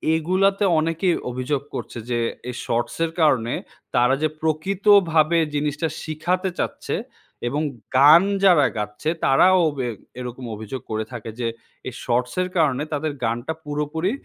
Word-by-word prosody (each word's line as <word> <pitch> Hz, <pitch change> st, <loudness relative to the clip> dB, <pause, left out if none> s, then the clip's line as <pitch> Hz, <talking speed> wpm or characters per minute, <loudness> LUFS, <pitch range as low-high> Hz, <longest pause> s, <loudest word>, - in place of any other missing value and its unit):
এগুলাতে 190 Hz, +5 st, +2 dB, 0.2 s
অনেকেই 165 Hz, +3 st, +1 dB, 0.2 s
অভিযোগ 130 Hz, +3 st, -2 dB
করছে -, -, -6 dB
যে 120 Hz, -1 st, 0 dB, 0.3 s
এই 125 Hz, -, -5 dB
শর্টসের 120 Hz, +8 st, -1 dB
কারণে 125 Hz, -6 st, +3 dB, 0.4 s
তারা 125 Hz, +2 st, +4 dB
যে -, -, +4 dB
প্রকৃতভাবে 170 Hz, 0 st, +3 dB, 0.2 s
জিনিসটা 150 Hz, +2 st, -1 dB, 0.2 s
শিখাতে 175 Hz, +4 st, -1 dB
চাচ্ছে। -, -, -2 dB, 0.5 s
এবং 145 Hz, +3 st, -1 dB, 0.4 s
গান 150 Hz, +6 st, +8 dB, 0.2 s
যারা 175 Hz, -7 st, +6 dB
গাচ্ছে 105 Hz, +7 st, -3 dB, 0.2 s
তারাও 185 Hz, +8 st, +5 dB
ওবে 135 Hz, -4 st, -3 dB, 0.3 s
এরকম 125 Hz, 0 st, -6 dB
অভিযোগ 110 Hz, +4 st, -6 dB
করে 110 Hz, 0 st, -1 dB
থাকে 115 Hz, -2 st, -7 dB
যে 120 Hz, -, 0 dB, 0.4 s
এই 130 Hz, -, -5 dB
শর্টস 125 Hz, +1 st, 0 dB
এর 185 Hz, -, -2 dB
কারণে 150 Hz, -4 st, +2 dB
তাদের 150 Hz, +1 st, -1 dB
গানটা 120 Hz, +6 st, -1 dB
পুরোপুরি 150 Hz, +5 st, -2 dB
150 Hz, 135 wpm, -22 LUFS, 125-165 Hz, 0.5 s, গান